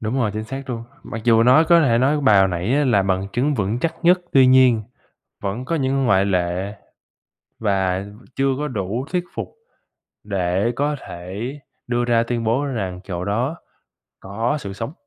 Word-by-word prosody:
Đúng 110 +3 -3
rồi, 115 -6 +1
chính 110 +1 -4
xác 135 +3 -6
luôn, 115 -1 -5 0.2
mặc 110 0 -7
dù 115 -1 +5
nói 130 +7 +6
có 170 0 +5
thể 120 -6 +3
nói 145 +4 +2
bài 110 -8 +5
hồi 95 0 +5
nãy 90 +8 -1
á 145 0 +2
là 105 -7 +3
bằng 95 0 0
chứng 140 +4 +1
vững 105 +1 -1
chắc 165 +4 -1
nhất, 180 +1 +5
tuy 130 -2 +6
nhiên 130 -3 +5 0.6
vẫn 105 +6 -3
có 165 - -1
những 135 -2 0
ngoại 100 -3 +3
lệ 90 +1 -1 0.8
và 95 -2 0 0.3
chưa 135 0 +1
có 150 +1 -2
đủ 110 +2 -3
thuyết 180 -1 0
phục - - -4 0.8
để 95 +2 0
có 145 +2 0
thể 90 +3 -8 0.5
đưa 120 0 0
ra 115 -1 +3
tuyên 115 -1 -2
bố 120 +6 +1
rằng 95 -9 -3
chỗ 90 -2 -5
đó 120 - -1 0.7
có 115 +9 -2
sự 100 -3 -6
sống. 115 +8 -5
115 Hz, 185 wpm, -21 LUFS, 100-135 Hz, 0.8 s, nói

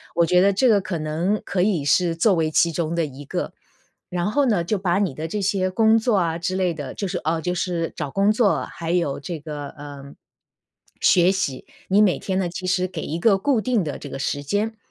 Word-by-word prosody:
我 170 - +4
觉 180 +2 +3
得 200 +1 +4
这 245 +6 +3
个 210 -3 +5
可 180 -2 -4
能 165 +7 -1
可 180 - -1
以 180 -7 +1
是 165 +4 +2
作 195 +4 +3
为 160 -1 +1
其 170 +2 +3
中 165 0 -2
的 170 -1 +1
一 140 0 -10
个。 - - -3 0.6
然 180 +3 -1
后 285 +4 +2
呢， 210 -9 +2
就 205 +5 -1
把 185 0 0
你 195 -8 0
的 155 +4 -5
这 205 +5 -3
些 190 -1 +1
工 220 +3 +4
作 230 0 +1
啊 165 -3 0
之 185 +2 -2
类 185 -2 +1
的， 145 -4 -6
就 200 -3 -4
是， - - -2
呃 160 +1 -1
就 180 +2 -1
是 175 -2 -2
找 140 - -4
工 200 +7 +2
作， 215 -2 +2
还 165 -1 -5
有 170 -6 0
这 165 +3 -5
个， 150 -1 -6
呃， 140 -1 -10 0.9
学 - - +5 0.2
习 140 -9 -3 0.2
你 195 +2 +4
每 205 -4 +3
天 190 -1 -2
呢， 185 -2 0
其 180 +2 -7
实 185 0 +1
给 185 - -6
一 160 - -3
个 200 +2 +4
固 240 +3 +1
定 240 -3 +1
的 150 -4 -4
这 145 - -8
个 135 - -6
时 145 +1 -2
间， 210 +8 -1
180 Hz, 255 characters per minute, -23 LUFS, 160-200 Hz, 0.9 s, 个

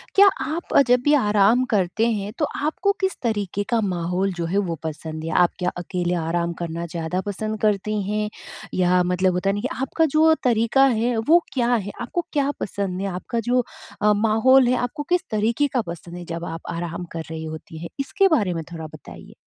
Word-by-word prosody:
क्या 400 +1 +8 0.2
आप 315 +5 -1
जब 245 +1 +5
भी 290 - +4
आराम 215 -1 +4
करते 205 +3 +2
हैं 205 -2 -3
तो 300 - +1 0.2
आपको 380 +6 +1
किस 380 0 0
तरीके 205 -4 -1
का 235 - +2
माहौल 180 0 -1
जो 170 -1 -3
है 175 +4 -1
वो 180 -5 0
पसंद 155 0 -5
है? 165 - -3
आप 175 +1 +4
क्या 180 -1 +1
अकेले 180 0 -2
आराम 170 +1 -1
करना 170 0 -4
ज़्यादा 170 +2 -3
पसंद 215 +2 -3
करती 210 0 +1
हैं, 210 0 -1 0.4
या 180 0 +3
मतलब 180 +1 +1
होता 180 +2 0
है - - +2
ना 205 - -3
कि 260 - -1
आपका 300 +5 +1
जो 320 +1 +6
तरीका 240 +2 +4
है 240 -1 +1
वो 335 +3 +7
क्या 245 -2 +1
है, 205 -3 -3
आपको 315 +8 -3
क्या 285 -2 +1
पसंद 195 -2 -3
है? 200 - -1
आपका 190 +5 -3
जो 250 0 +3 0.4
अ, 210 0 +5
माहौल 225 +5 +4
है 250 - +3
आपको 245 +4 -3
किस 360 0 +3
तरीके 225 +6 +1
का 250 - +2
पसंद 170 +1 -7
है 175 - -8
जब 170 0 -5
आप 165 0 -6
आराम 170 +1 -4
कर 165 -1 -4
रही 160 0 -5
होती 160 0 -8
हैं? 170 +1 -7
इसके 390 +8 +2
बारे 215 - +2
में 165 -1 -4
थोड़ा 160 -1 -6
बताइए। 155 -2 -12
205 Hz, 205 wpm, -23 LUFS, 175-245 Hz, 0.4 s, क्या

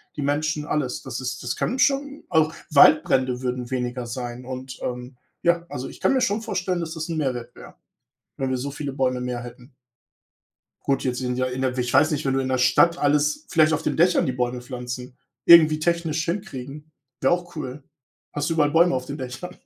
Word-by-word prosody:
die 150 - -4
Menschen, 150 +2 -1
alles. 145 -4 -2
Das 130 -2 -6
ist 125 0 -4
das 120 - -3
kann 260 - -2
schon, 280 +1 +1
auch 160 -1 +3 0.2
Waldbrände 135 -4 +5
würden 125 -1 -3
weniger 125 -1 -2
sein. 120 +1 -6
Und, 130 0 -7
ähm, 125 +1 -5 0.3
ja, 170 0 +2
also, 125 +1 -5
ich - - -13
kann - - +2
mir 260 - +2
schon 210 -1 +1
vorstellen, 185 -4 -2
dass 160 -1 -4
das 160 0 -5
'n 165 - -2
Mehrwert 125 -5 -3
wäre, - - -12 0.6
wenn 135 -1 -2
wir 130 - 0
so 140 +3 -4
viele 140 0 -5
Bäume 130 -2 0
mehr 125 -1 -3
hätten. 125 +2 -12 1.1
Gut, 135 - +1
jetzt 125 -2 -1
sind 125 -1 -2
ja 130 - +1
in 130 +1 -4
der 130 -1 0
ich 120 -1 -1
weiß 155 +3 +5
nicht, 150 -2 -2
wenn 135 - +1
du 135 - +1
in 130 - -2
der 130 0 +1
Stadt 130 +7 +4
alles 150 - +1
vielleicht 155 -2 +4
auf 155 - 0
den - - -1
Dächern 175 +2 +4
die 130 - 0
Bäume 125 0 -2
pflanzen, 125 0 -7 0.3
irgendwie 155 -2 +8
technisch 165 -1 0
hinkriegen, 150 -5 -5 0.3
wäre 135 - +4
auch 175 -1 -2
cool. 140 -1 -6 0.5
Hast 145 +2 -1
du - - +1
überall 150 -2 +3
Bäume 170 0 +4
auf 130 0 -3
den 140 - -5
Dächern. 130 +8 -7
135 Hz, 210 wpm, -24 LUFS, 125-160 Hz, 1.1 s, irgendwie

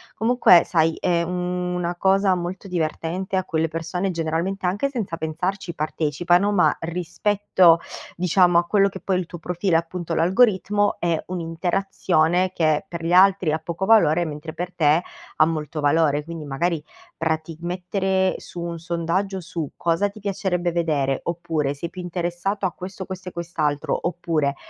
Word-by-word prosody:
Comunque, 225 -6 +5
sai, 160 -2 +2
è 170 -1 +1
una 180 0 -2
cosa 190 +1 +3
molto 180 +2 -5
divertente 180 +2 -2
a 185 - +1
cui 160 -3 -1
le 165 - +2
persone 165 +4 -2
generalmente, 170 +4 -2
anche 200 +10 0
senza 225 -11 -3
pensarci, 170 +4 -3
partecipano, 170 +5 +1
ma 200 -4 +3
rispetto 175 +1 +2 0.4
diciamo 175 0 +4
a 170 - +3
quello 200 +2 +3
che 190 - -9
poi 190 - -1
è - - +1
il 180 - -3
tuo 175 - -9
profilo 175 +1 -1
e - - +7
appunto 170 0 -4
l'algoritmo, 205 +3 +2
è 170 -2 0
un'interazione 170 -1 -4 0.9
che 155 0 +1
per 170 -1 -6
gli 170 - 0
altri 185 -2 +5
ha 155 - 0
poco 170 +4 -4
valore, 175 -6 +4
mentre 155 +1 -6
per 180 +1 -5
te 160 0 +3 0.3
ha 155 - +5
molto 155 -1 -3
valore. 145 0 +2
Quindi 165 -1 -7
magari, 150 +3 -1 0.4
prati 160 0 -2
mettere 190 +2 0
su 175 - -10
un 170 -1 -4
sondaggio 175 +4 -2
su: 165 -3 -5
"Cosa 170 +4 +1
ti 205 - -13
piacerebbe 190 -3 -1
vedere?" 150 -5 0
oppure, 165 -4 -2
"Sei 170 +4 -5
più 185 - -7
interessato 175 +3 -2
a 185 - 0
questo, 190 +2 -8
questo 185 0 -7
e - - -15
quest'altro", 155 -4 -1
oppure, 160 -5 -1
175 Hz, 165 wpm, -23 LUFS, 165-185 Hz, 0.9 s, e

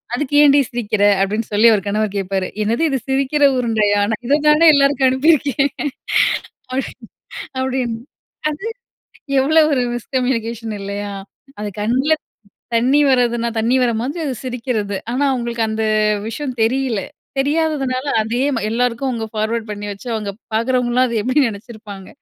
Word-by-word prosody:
அதுக்கு 290 +2 -2
ஏன்டி 285 0 +6
சிரிக்கிற?" 215 -4 -1 0.2
அப்டின்னு 210 +3 -1
சொல்லி 215 +3 +5
அவரு 200 - 0
கணவர் 210 0 -1
கேட்பாரு. 190 -1 -2 0.2
"என்னது 230 +9 0
இது 270 -2 0
சிரிக்கிற 275 +2 +1
உருண்டையா! 215 -4 +1
நான் 225 +3 -4
இத 290 +3 +3
தான 315 +2 +6
எல்லாருக்கும் 275 -2 +3
அனுப்பியிருக்கேன்." 280 0 +2 1.0
அப்டின் 260 -3 -5 0.5
அப்டின்னு 255 -3 -2 0.5
அது 305 +6 -7 0.8
எவ்ளோ 310 +4 +4
ஒரு 260 -3 +2
மிஸ்கம்யூனிகேஷன் 235 -2 -2
இல்லையா? 200 +1 -4 0.5
அது 210 - -3
கண்ல 260 +8 +1 0.6
தண்ணி 255 +5 +3
வரதுன்னா 240 -2 +2
தண்ணி 230 +4 +2
வர 245 - +2
மாதிரி 280 +8 -3
அது 275 - -2
சிரிக்கிறது. 230 -5 -3
ஆனா 260 +4 0
அவங்களுக்கு 235 -2 -2
அந்த 220 0 -2 0.4
விஷயம் 255 +3 -4
தெரியல. 250 -2 +1 0.4
தெரியாததுனால 280 -3 0 0.2
அதே 230 +3 -2
ம 230 - -2
எல்லாருக்கும் 245 +3 0
அவங்க 230 -3 -3
ஃபார்வர்ட் 220 +1 -2
பண்ணி 205 0 -5
வச்சு, 200 +5 -9
அவங்க 210 -2 -3 0.2
பாக்குறவங்கலாம் 250 +2 +2
அது 230 -2 -1
எப்டி 255 +5 +2
நெனச்சிருப்பாங்க? 210 -3 -8
240 Hz, 140 wpm, -19 LUFS, 220-265 Hz, 1.0 s, ஏன்டி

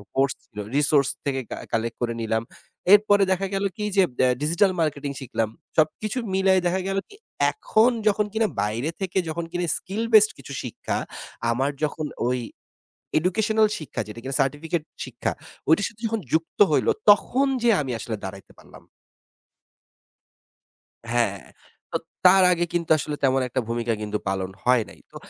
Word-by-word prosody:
Course 135 0 +2
ছিলো, 105 -1 -8
resource 145 -1 +4 0.2
থেকে 135 -2 0
কা - - -4
কালেক্ট 115 +1 -1
করে 120 -1 0
নিলাম। 110 0 0 0.5
এরপরে 205 -1 +6
দেখা 190 +1 +1
গেল 195 +1 0
কি 210 - -3
যে 195 - +7
ব্যা 130 - +4
ডিজিটাল 170 +6 +3
মার্কেটিং 145 -3 -1
শিখলাম। 115 -3 -2 0.3
সবকিছু 165 +9 +1 0.2
মিলায় 190 -1 +3
দেখা 185 +2 0
গেল 195 0 -1
কি? 410 - -14 0.4
এখন 240 - +3 0.2
যখন 210 0 +3
কিনা 220 0 +2
বাইরে 115 +8 -1
থেকে 190 -1 -2
যখন 165 +1 -3
কিনা 175 0 -1
skill 200 +4 -4
based 215 0 +7
কিছু 140 - -9
শিক্ষা 125 - -4 0.5
আমার 135 +4 0
যখন 155 +1 -1 0.2
ওই 125 0 0 0.8
এডুকেশনাল 215 +5 +2
শিক্ষা 150 -8 -4
যেটা 110 +2 -8
কিনা 135 +1 -2
সার্টিফিকেট 150 +4 -1 0.2
শিক্ষা, - - -3 0.4
ওইটার 180 +6 +4
সাথে 225 -1 -14
যখন 225 -1 -1
যুক্ত 160 +1 -1
হইল, 150 - +2 0.2
তখন 250 +7 +4
যেয়ে 230 -3 +4
আমি 135 -3 -4
আসলে 110 +1 -4
দাঁড়াইতে 95 0 -8
পারলাম। - - -16 2.3
হ্যাঁ। 115 -5 +1 0.5
তো - - -5 0.3
তার 190 +1 +8
আগে 175 -1 +1
কিন্তু 170 -1 -1
আসলে 150 0 -3
তেমন 135 0 +3
একটা 130 +1 -2
ভূমিকা 115 0 -1
কিন্তু 105 0 -2
পালন 95 -1 -2
হয় 125 -2 +4
নাই। - - -15
তো - - -20
155 Hz, 160 wpm, -24 LUFS, 125-195 Hz, 2.3 s, তার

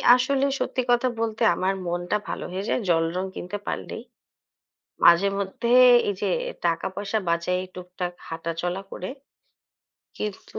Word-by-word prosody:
আসলে 265 +2 +1
সত্যি 255 - -1
কথা 245 +1 +3
বলতে 225 0 -1
আমার 190 +1 0
মনটা 175 +3 -1
ভালো - - -4
হয়ে 190 +2 -3
যায় - - +1
জলরঙ 170 +2 +1
কিনতে 180 +4 -5
পারলেই। - - -4 1.0
মাঝে 170 +3 +7
মধ্যে 200 +4 -3 0.4
এই - - 0
যে - - +1 0.4
টাকা 170 +2 +1
পয়সা 205 +3 -2
বাঁচাই 170 +2 0
টুকটাক 180 0 -5
হাঁটাচলা 165 +3 -3
করে। 185 - -5 1.1
কিন্তু 210 -2 -5
185 Hz, 130 wpm, -25 LUFS, 175-210 Hz, 1.1 s, মাঝে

